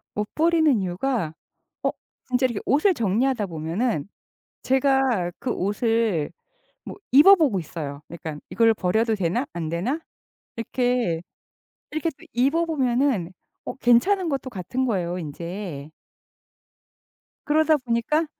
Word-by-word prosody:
못 210 0 -3
버리는 315 -6 +3
이유가 185 - -1 0.5
어 - - +3 0.4
진짜 255 +1 +1
이렇게 235 -5 -1
옷을 310 +8 +3
정리하다 230 - 0
보면은 165 - -2 0.6
제가 265 -8 +2
그 255 - -2
옷을 210 -5 0 0.5
뭐 - - -8 0.2
입어보고 295 - +6
있어요, 150 -3 -6
약간. 160 -3 -7
'이걸 225 -1 +4
버려도 220 +5 +1
되나 195 +7 -1
안 165 -2 -4
되나?' 200 - -2 0.6
이렇게, 240 -7 0 0.7
이렇게 310 +2 -1
또 270 - -18
입어보면 265 - +1 0.3
어 - - -5
괜찮은 330 +11 +3
것도 270 -3 -2
같은 245 +5 -3
거예요, 180 -6 -1
인제. 170 -1 -6 1.6
그러다 310 +1 +4
보니까 255 +5 0
235 Hz, 250 characters per minute, -24 LUFS, 180-270 Hz, 1.6 s, 입어보고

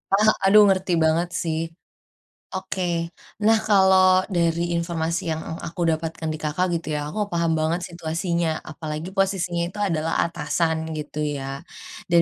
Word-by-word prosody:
Ah, 215 +2 +5 0.2
aduh 210 +1 +8
ngerti 190 -1 +1
banget 165 +2 +2
sih. 160 -1 -1 0.9
Oke, 185 0 -3 0.6
nah 225 0 +6
kalau 190 -2 +5
dari 170 0 +2 0.2
informasi 170 0 -1
yang 160 - -4
ang 160 - -6
aku 170 +1 -6
dapatkan 160 0 -3
di - - -5
Kakak 155 +5 0
gitu 165 - -10
ya, - - -1
aku 215 - -5
paham 170 -1 +1
banget 165 +3 0
situasinya. 170 0 -1
Apalagi 155 +2 -6
posisinya 185 -3 +1
itu 205 +4 -9
adalah 165 -5 0
atasan 165 -1 0 0.2
gitu 150 0 -6
ya. 135 -1 -4 0.4
Dan 170 -1 +5
170 Hz, 145 wpm, -23 LUFS, 160-185 Hz, 0.9 s, aduh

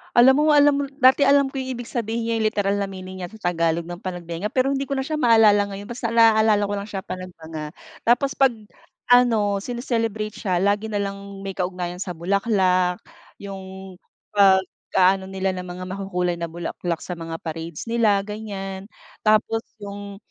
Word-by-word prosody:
Alam 255 +2 +7
mo, - - +3
alam 290 0 +6
mo - - +1 0.2
dati 260 +2 +6
alam 280 -1 +4
ko 270 - -4
yung 260 0 -4
ibig 240 0 -8
sabihin 230 -1 -2
niyang 225 -1 0
literal 205 -2 0
na 200 - -1
meaning 185 -1 -8
niya 180 - -4
sa 210 -5 -2
Tagalog 165 0 0
ng 175 +1 -8
Panagbenga 175 0 -4
pero 255 +4 +1
hindi 275 0 -2
ko 275 - -2
na 265 - -1
siya 305 +2 -3
maalala 220 -5 +5
ngayon 200 +1 -8
basta 240 0 -3
naalala 220 -2 +5
ko 205 - -3
lang 200 +1 -5
siya 195 -3 -5
Panagbenga. 160 -5 -7 0.3
Tapos 250 +4 +3
pag 270 -2 +4 0.6
ano 225 -5 +4
sini-celebrate 225 -4 -2
siya 185 -3 -1
lagi 205 +2 +1
nalang 200 -1 -4
may 195 -1 -5
kaugnayan 180 -1 -3
sa 185 -1 -4
bulaklak 185 0 +1 0.4
yung 190 -1 -9 0.4
pag 195 -2 +5 0.4
aano 190 +1 +3
nila 190 0 -1
ng 185 - -5
mga 180 +1 -7
makukulay 180 -2 -1
na 170 0 -3
bulaklak 170 0 -4
sa 180 - -4
mga 165 -1 -6
parades 165 0 -5
nila, 230 -3 +3
ganyan. 200 -2 -6 0.3
Tapos 215 +1 +2 0.2
yung, 200 -1 -8
200 Hz, 175 wpm, -23 LUFS, 185-225 Hz, 0.6 s, Alam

